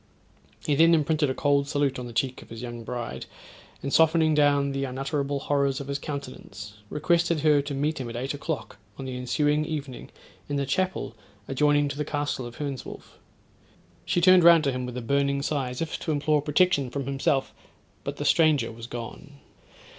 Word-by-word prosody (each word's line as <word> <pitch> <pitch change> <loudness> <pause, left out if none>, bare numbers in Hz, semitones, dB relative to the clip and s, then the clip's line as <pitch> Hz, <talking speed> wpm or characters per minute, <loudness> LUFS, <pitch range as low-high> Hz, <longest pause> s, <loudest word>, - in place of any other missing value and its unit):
He 150 - +1
then 165 +3 +6
imprinted 155 -1 +1
a 130 - -2
cold 140 -1 +2
salute 145 -3 0
on 125 - -6
the - - -8
cheek 130 +2 -1
of - - -15
his 115 +1 -8
young 120 -1 -6
bride, 120 0 -5 0.6
and 140 - -3
softening 160 -1 +4
down 145 -1 +3
the 135 0 -2
unutterable 140 +2 -2
horrors 140 -1 +1
of 140 - -7
his 140 0 -2
countenance, 110 -8 -8
requested 170 +1 +1
her 150 -2 +4
to 140 0 -5
meet 150 +3 -1
him 125 -3 -4
at 115 - -7
eight 130 +4 -3
o'clock 145 -5 -5 0.2
on 135 - -6
the 130 -1 -5
ensuing 145 +4 +1
evening 145 -5 -5 0.4
in 145 - -1
the 140 -1 0
chapel 185 - -1 0.3
adjoining 145 +1 +2
to 140 0 -5
the 150 - -1
castle 145 -4 -3
of 120 - -11
Hernswolf. 140 -4 -7 0.8
She 175 - 0
turned 185 0 +7
round 170 -2 +7
to 140 - +1
him 125 -1 -3
with 125 0 -6
a - - -3
burning 140 +2 +1
sigh, 140 -4 -1
as 125 +5 -3
if 160 - -5
to 160 - -3
implore 150 0 +2
protection 150 -2 +2
from 140 +1 -4
himself, 135 0 0 0.5
but - - -5
the - - -4
stranger 150 -8 +3
was 115 +1 -9
gone. 120 +4 -8
140 Hz, 190 wpm, -26 LUFS, 130-150 Hz, 0.8 s, turned